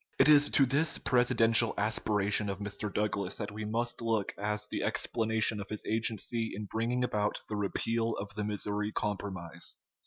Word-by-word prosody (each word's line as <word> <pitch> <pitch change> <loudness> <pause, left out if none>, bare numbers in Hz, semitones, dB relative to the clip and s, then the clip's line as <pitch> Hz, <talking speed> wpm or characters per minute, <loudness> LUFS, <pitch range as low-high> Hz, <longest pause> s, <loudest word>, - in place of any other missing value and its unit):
It - - +6
is 145 -1 +7
to 135 - +6
this 140 +5 +2
presidential 115 -2 +4
aspiration 105 -1 +1
of 100 - -3
Mr. 105 0 -4
Douglas 100 -2 -2
that 105 -2 -4
we 105 +1 -6
must 120 +3 -2
look 115 -3 -1
as 105 +1 -2
the - - -4
explanation 110 -2 0
of 100 - -9
his 105 - -4
agency 115 +1 0
in 105 - -5
bringing 115 +4 -1
about 105 -4 -1
the 105 - -4
repeal 115 +3 -1
of 100 +1 -6
the 105 0 -3
Missouri 105 0 -2
Compromise. 95 -5 -4
105 Hz, 165 wpm, -31 LUFS, 105-115 Hz, -, is